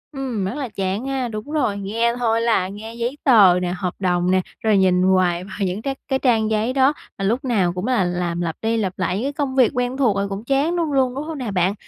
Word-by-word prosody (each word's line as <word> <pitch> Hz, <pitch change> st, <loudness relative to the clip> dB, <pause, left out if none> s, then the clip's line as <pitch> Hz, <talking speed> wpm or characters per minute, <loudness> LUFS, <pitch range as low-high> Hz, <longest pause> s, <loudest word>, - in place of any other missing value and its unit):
Ừm, 250 Hz, -7 st, -3 dB
rất 190 Hz, -, -3 dB
là 280 Hz, -4 st, -4 dB
chán 195 Hz, +5 st, -2 dB
ha, 265 Hz, -2 st, -1 dB
đúng 215 Hz, +4 st, -6 dB
rồi, 285 Hz, -10 st, 0 dB
nghe 225 Hz, +4 st, 0 dB
thôi 230 Hz, -1 st, +1 dB
là 225 Hz, -6 st, +2 dB
nghe 210 Hz, +4 st, -8 dB
giấy 235 Hz, +4 st, -3 dB
tờ 200 Hz, -8 st, +6 dB
nè, 180 Hz, 0 st, -1 dB
hợp 180 Hz, -2 st, -3 dB
đồng 180 Hz, -1 st, +1 dB
nè, 185 Hz, -, +3 dB, 0.2 s
rồi 215 Hz, -2 st, +3 dB
nhìn 185 Hz, -1 st, +3 dB
hoài 185 Hz, -2 st, +2 dB
vào 190 Hz, 0 st, -9 dB
những 185 Hz, +4 st, -3 dB
cái 270 Hz, +2 st, -3 dB
cái 265 Hz, -1 st, 0 dB
trang 225 Hz, -5 st, +2 dB
giấy 220 Hz, +3 st, 0 dB
đó, 270 Hz, +2 st, +4 dB, 0.2 s
mà 195 Hz, -, -2 dB
lúc 235 Hz, +7 st, 0 dB
nào 195 Hz, -9 st, +1 dB
cũng 180 Hz, +6 st, -4 dB
là 245 Hz, -7 st, +2 dB
làm 175 Hz, -1 st, -2 dB
lặp 165 Hz, -2 st, -2 dB
đi 225 Hz, +1 st, 0 dB
lặp 190 Hz, -4 st, -2 dB
lại 185 Hz, 0 st, 0 dB
những 230 Hz, -, -2 dB
cái 285 Hz, -, -2 dB
công 275 Hz, -2 st, -2 dB
việc 255 Hz, -4 st, +4 dB
quen 250 Hz, +1 st, -1 dB
thuộc 240 Hz, -8 st, +2 dB
rồi 200 Hz, 0 st, -1 dB
cũng 195 Hz, +2 st, -5 dB
chán 275 Hz, +7 st, +1 dB
đúng 330 Hz, -3 st, -1 dB
luôn 260 Hz, -2 st, +1 dB
đúng 280 Hz, -, -3 dB
hông 315 Hz, -1 st, -6 dB
nè 245 Hz, -5 st, -4 dB
bạn? 185 Hz, 0 st, +1 dB
220 Hz, 265 wpm, -21 LUFS, 185-260 Hz, 0.2 s, tờ